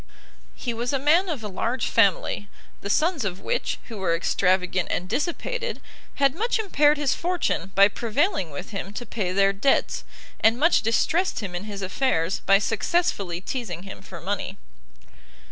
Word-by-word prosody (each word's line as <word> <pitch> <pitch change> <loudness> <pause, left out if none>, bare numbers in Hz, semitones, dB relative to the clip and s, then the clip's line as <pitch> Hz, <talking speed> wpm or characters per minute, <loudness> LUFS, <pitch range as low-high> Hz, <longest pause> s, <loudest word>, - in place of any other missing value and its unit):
He 240 - -3
was 240 +3 -2
a - - +3
man 325 +8 +3
of 285 -9 -3
a - - -3
large 230 +5 -2
family, 205 -1 +2 0.3
the 200 - -5
sons 315 - +2
of 190 -2 -3
which, - - -1
who 225 - -9
were 180 -4 +1
extravagant 180 +1 +1
and 180 - -2
dissipated, 475 - -2 0.4
had 275 -2 +3
much 455 +10 0
impaired 300 -9 +3
his 290 -2 +1
fortune 345 - -1
by 200 0 +8
prevailing 230 - 0
with 150 +8 -7
him 200 -1 -5
to 245 - -5
pay 205 -5 -2
their 195 +1 +3
debts, 235 +8 +1 0.4
and 225 +2 +4
much 330 +6 +4
distressed 320 +9 +1
him 195 -4 -5
in 175 +3 -4
his 200 -2 -6
affairs 190 -4 0
by 195 - +7
successfully 200 - 0
teasing 190 -7 -4
him 195 - -9
for - - -10
money. - - -3
225 Hz, 165 wpm, -25 LUFS, 195-295 Hz, 0.4 s, by